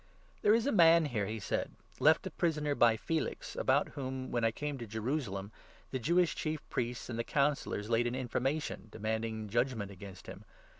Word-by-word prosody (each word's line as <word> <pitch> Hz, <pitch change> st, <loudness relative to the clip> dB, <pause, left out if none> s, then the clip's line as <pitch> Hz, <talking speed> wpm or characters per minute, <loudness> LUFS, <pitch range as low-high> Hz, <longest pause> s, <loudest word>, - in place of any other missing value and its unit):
"There 210 Hz, -, +5 dB
is 230 Hz, -, +1 dB
a 285 Hz, -, +2 dB
man 170 Hz, -3 st, +6 dB
here," 110 Hz, -8 st, -1 dB
he 110 Hz, 0 st, -4 dB
said, 95 Hz, -, -2 dB, 0.3 s
"left -, -, +5 dB
a -, -, -4 dB
prisoner 150 Hz, -4 st, 0 dB
by 115 Hz, -4 st, +4 dB
Felix, 160 Hz, +7 st, -3 dB
about -, -, +2 dB
whom, 130 Hz, -1 st, -5 dB
when 120 Hz, -, 0 dB
Icame 135 Hz, +5 st, -1 dB
tojerusalem, 110 Hz, -3 st, -3 dB, 0.4 s
the 130 Hz, -, -2 dB
Jewish 170 Hz, +7 st, +3 dB
Chief 155 Hz, -2 st, -3 dB
Priests 120 Hz, 0 st, -2 dB
15 120 Hz, -, -6 dB
and 115 Hz, -, -3 dB
the -, -, +1 dB
Councillors 140 Hz, -6 st, 0 dB
laid 120 Hz, +1 st, +2 dB
an 120 Hz, -, -2 dB
information, 130 Hz, +1 st, -2 dB
demanding 110 Hz, 0 st, -3 dB
judge 120 Hz, +5 st, +1 dB
ment 100 Hz, -2 st, -5 dB
against 95 Hz, -1 st, -10 dB
him. -, -, -9 dB
125 Hz, 185 wpm, -33 LUFS, 110-150 Hz, 0.4 s, man